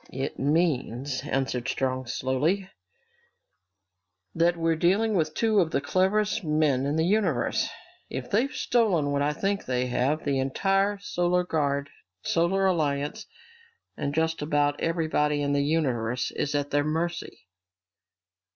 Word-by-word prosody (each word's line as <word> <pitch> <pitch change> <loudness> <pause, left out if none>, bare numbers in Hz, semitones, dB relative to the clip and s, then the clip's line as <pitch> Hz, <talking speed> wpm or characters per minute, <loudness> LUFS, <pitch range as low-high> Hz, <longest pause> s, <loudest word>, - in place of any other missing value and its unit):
"It 135 +1 -4
means," 140 -3 0
answered 130 -3 -1
Strong 130 -1 -1
slowly, 140 +11 0 1.7
"that 170 +1 +2
we're 165 0 +1
dealing 195 +7 +2
with 155 -4 0
two 220 -2 +2
of 170 -4 +2
the 140 - 0
cleverest 200 +8 +1
men 150 -4 +1
in 145 - 0
the 160 0 +2
universe! 180 - +1 0.4
If 130 - -5
they've 245 +7 +2
stolen 190 -12 +1
what 140 0 0
I 145 +1 +2
think 195 +6 -2
they 125 0 0
have, 135 +6 0
the 140 -2 +1
entire 195 +9 +1
Solar 180 -2 0
Guard, 145 -4 -1 0.3
Solar 180 +3 +1
Alliance, 150 -5 0 0.7
and 140 - -2
just 160 0 0
about 145 -1 +1
everyone 160 -3 +1
in 145 -1 0
the 140 0 +2
universe 125 -6 0
is 145 0 -2
at 145 0 -1
their 145 0 +2
mercy!" 160 - -3
155 Hz, 135 wpm, -26 LUFS, 140-180 Hz, 1.7 s, that